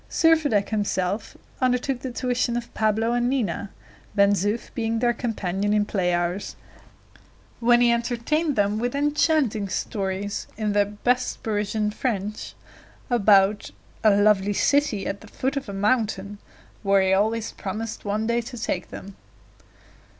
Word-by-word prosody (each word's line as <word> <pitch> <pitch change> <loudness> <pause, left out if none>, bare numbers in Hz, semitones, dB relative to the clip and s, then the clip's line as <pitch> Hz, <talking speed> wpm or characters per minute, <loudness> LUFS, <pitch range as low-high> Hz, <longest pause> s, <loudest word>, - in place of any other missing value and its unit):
Servadac 310 -11 +3
himself 205 -1 -2 0.2
undertook 255 +1 +1
the 260 - -5
tuition 245 -1 -1
of 235 -1 -6
Pablo 220 +1 +1
and 245 0 +1
Nina, 210 -6 -1 0.5
Ben 200 -1 +5
Zoof 205 +4 -2
being 225 -1 -1
their 240 +1 +2
companion 205 -4 -2
in 210 -1 +2
play 185 -4 0
hours, 175 +3 -2 1.0
when 240 0 +4
he 240 -1 +5
entertained 245 +6 0
them 205 +1 +1
with 245 +3 -2
enchanting 290 -7 +1
stories 200 0 -3
in 215 -2 -1
the 205 0 +3
best 245 +5 -1
Parisian 210 0 -1
French, 210 -3 -3 0.6
about 205 -3 +4 0.3
"a 220 - +6
lovely 205 0 +3
city 280 -3 +1
at 200 - -4
the 220 - -13
foot 265 +6 -2
of 275 -6 -4
a - - -4
mountain," 205 -1 -1 0.4
where 195 -1 +3
he 190 0 +2
always 220 +3 +1
promised 215 +3 -5
one 210 +1 -1
day 235 +1 +1
to 245 +1 -9
take 235 - -3
them. 195 0 -9
215 Hz, 145 wpm, -24 LUFS, 200-240 Hz, 1.0 s, a